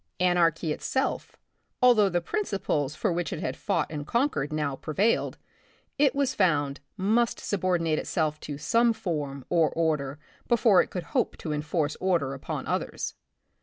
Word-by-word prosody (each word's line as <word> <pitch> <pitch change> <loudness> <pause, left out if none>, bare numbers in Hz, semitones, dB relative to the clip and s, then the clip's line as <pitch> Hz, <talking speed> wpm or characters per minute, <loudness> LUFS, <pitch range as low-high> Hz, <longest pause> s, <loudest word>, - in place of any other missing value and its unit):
Anarchy 170 -3 +2
itself, 265 - -2 0.4
although 235 -5 +5
the 175 -1 0
principles 180 - -1
for 200 -6 0
which 175 0 -2
it - - -4
had 130 - -3
fought - - 0
and 145 -2 -5
con 270 +5 +2
quered 145 - -3
now. 150 -3 -1
prevailed, 190 +11 0 0.6
it 280 -2 +4
was 280 -2 +1
found, 145 -7 +1 0.2
must 220 +5 +1
sub 200 -3 -3
ordinate 165 -4 +1
itself 155 -3 -1
to 145 - -6
some 230 +9 +3
form 145 - -4
or 165 -3 +3
order 150 -4 -1 0.3
before 230 -6 +5
it - - -4
could 180 - -4
hope 255 -4 +1
to 155 - -4
enforce 150 0 -1
order 170 -8 +1
upon 135 - -5
others. - - -2
170 Hz, 160 wpm, -27 LUFS, 150-210 Hz, 0.6 s, although